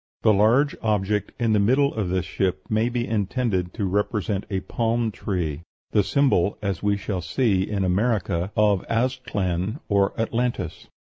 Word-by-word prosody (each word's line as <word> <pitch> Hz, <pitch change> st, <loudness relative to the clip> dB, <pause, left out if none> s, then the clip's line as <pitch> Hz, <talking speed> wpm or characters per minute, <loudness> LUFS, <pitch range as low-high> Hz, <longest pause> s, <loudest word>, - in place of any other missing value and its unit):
The 110 Hz, -, +5 dB
large 115 Hz, +8 st, +3 dB
object 105 Hz, -1 st, 0 dB
in 115 Hz, -2 st, +2 dB
the 105 Hz, -, +3 dB
middle 130 Hz, +7 st, +3 dB
of 105 Hz, -5 st, -2 dB
this 90 Hz, -1 st, 0 dB
ship 90 Hz, +1 st, -1 dB
may 110 Hz, +2 st, +2 dB
be 120 Hz, 0 st, -2 dB
intended 105 Hz, -3 st, -1 dB
to 105 Hz, -, -1 dB
represent 100 Hz, +1 st, -1 dB
a 95 Hz, -2 st, -1 dB
palm 115 Hz, +2 st, -1 dB
tree 85 Hz, -8 st, -3 dB, 0.3 s
the 105 Hz, -, +4 dB
symbol, 105 Hz, -6 st, +2 dB
as 100 Hz, -4 st, -3 dB
we 105 Hz, 0 st, +1 dB
shall 95 Hz, -2 st, -3 dB
see, 95 Hz, +2 st, +1 dB
in 100 Hz, -2 st, -1 dB
America, 95 Hz, -2 st, 0 dB
of 105 Hz, -3 st, +3 dB
Aztlan, 110 Hz, -, -1 dB
or 100 Hz, 0 st, +1 dB
Atlantis. 115 Hz, -5 st, -2 dB
105 Hz, 155 wpm, -24 LUFS, 95-115 Hz, 0.3 s, The